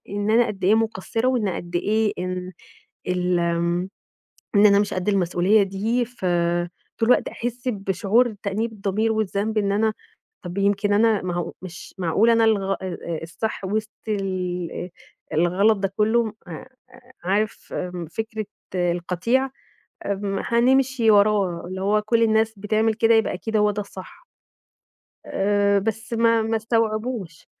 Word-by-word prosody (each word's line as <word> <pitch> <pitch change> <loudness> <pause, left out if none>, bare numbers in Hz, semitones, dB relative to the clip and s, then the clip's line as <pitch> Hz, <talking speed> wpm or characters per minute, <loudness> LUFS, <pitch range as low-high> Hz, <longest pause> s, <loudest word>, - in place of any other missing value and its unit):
إن 205 +1 -2
أنا 235 +2 +4
قد 205 -4 -5
إيه 205 +4 +5
مقصّرة 225 +2 0
وإن 240 -6 +1
قد 175 -1 -4
إيه 215 +3 +1
إن 185 0 -4 0.6
ال 180 -1 +1
آمم 170 +2 0 0.7
إن 205 +1 +6
أنا 200 -1 +6
مش 205 -1 0
قد 185 +2 -1
المسؤولية 195 +2 +3
دي، 215 +6 -1
ف 240 -5 -9 0.7
طول 225 +1 +1
الوقت - - +4
أحس 240 +1 -5
بشعور 210 +2 +1
تأنيب 215 +3 -1
الضمير 215 +2 -1
والذنب 215 0 -1
إن 200 -1 +1
أنا 215 +1 +1 0.5
طَب 180 +1 -7
يمكن 200 +1 +2
أنا 220 -1 +3
ما 180 -1 -3
هو 175 -1 -3
مش 180 -1 -10
معقولة 195 +6 +3
أنا 230 0 +3
الغ 200 -3 +1
آآ - - -4
آآ 170 -3 -4
الصح 200 +6 -4
وسط 215 +2 -2 0.2
الإيه 180 -3 -3 0.4
الغلط 185 +7 +3
ده 195 0 -2
كلّه 220 +1 +2
أ - - -9
أ 160 - -8 0.6
عارف 205 +4 -1
آمم 180 -1 -4
فكرة 220 +3 -4 0.3
القطيع؟ 180 +9 0 0.6
آمم 200 0 -2
هنمشي 250 0 +3
وراه، 200 -4 +3
اللي 185 +1 -6
هو 210 +2 +2
كل 230 +2 +2
الناس 220 0 +2
بتعمل 215 +2 +1
كده 230 +1 +3
يبقى 220 -3 +2
أكيد 220 +4 -3
هو 210 0 +3
ده 205 - -3
الصح. 190 -2 -12 1.0
آآ 200 0 +2
بس 225 +3 -3
ما 230 0 +3
ما 225 0 0
استوعبوش. 220 -4 -2
205 Hz, 150 wpm, -23 LUFS, 185-225 Hz, 1.0 s, إن